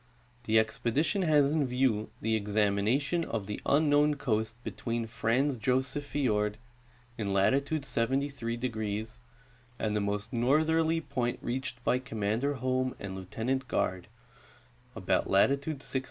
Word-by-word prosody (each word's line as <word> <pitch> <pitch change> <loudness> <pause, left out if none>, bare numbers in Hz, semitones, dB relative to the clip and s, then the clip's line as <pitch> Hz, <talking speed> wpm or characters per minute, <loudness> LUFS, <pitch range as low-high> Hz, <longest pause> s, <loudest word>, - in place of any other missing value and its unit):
The 110 0 +3
expedition 135 - +1
l).as 150 -4 +4
in 150 -4 +2
view 125 -4 +1
the 110 0 +1
examination 105 - +1
of 115 -9 -3
the 105 +1 -5
unknown 150 0 +4
coast 110 -5 -1
between 115 0 -3
Franz 125 +4 0
Josef 130 +5 0
fiord, 105 -8 0 0.6
in 100 -2 -1
latitude 140 +9 +2
73°, 115 -4 -2 0.6
and 105 -1 -1
the 105 - +1
most 100 +2 -2
northerl}^ 160 +6 +2
point 125 -3 -1
reached 125 -1 -4
by 125 - +2
Commander 115 +3 -1
Holm 130 0 -1
and 100 -1 -6
Lieutenant 120 +8 -2
Garde, 90 -4 -1 0.9
about - - 0
latitude 140 +8 +2
66°. 135 - -2
125 Hz, 125 wpm, -30 LUFS, 110-140 Hz, 0.9 s, l).as